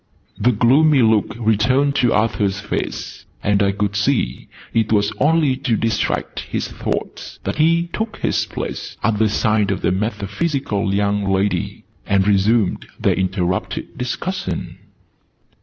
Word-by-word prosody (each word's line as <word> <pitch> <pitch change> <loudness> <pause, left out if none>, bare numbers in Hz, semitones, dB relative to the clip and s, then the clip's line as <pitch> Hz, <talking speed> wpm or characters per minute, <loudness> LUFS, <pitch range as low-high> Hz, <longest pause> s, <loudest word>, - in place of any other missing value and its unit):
The 125 - +4
gloomy 135 +5 +4
look 110 -2 +2
returned 120 +6 +2
to 120 - +3
Arthur's 105 -3 +1
face: 100 - -4 0.2
and 105 0 +2
I 100 -1 +3
could 100 0 -2
see 110 - 0 0.3
it 110 -2 +1
was 105 -2 +2
only 150 -2 +3
to 130 -5 0
distract 115 -1 -1
his - - -3
thoughts - - -5
that - - -3
he 165 +2 +3
took 220 0 -3
his - - 0
place - - -6
at 110 -1 +1
the 110 -1 +3
side 105 0 +1
of 100 - -1
the - - +2
metaphysical 105 - -1
young 100 0 0
lady, 95 +1 -1 0.2
and 100 0 +2
resumed 105 +1 +2
their - - +2
interrupted 95 -1 -2
discussion. 125 - -4
105 Hz, 140 wpm, -20 LUFS, 100-130 Hz, 0.3 s, The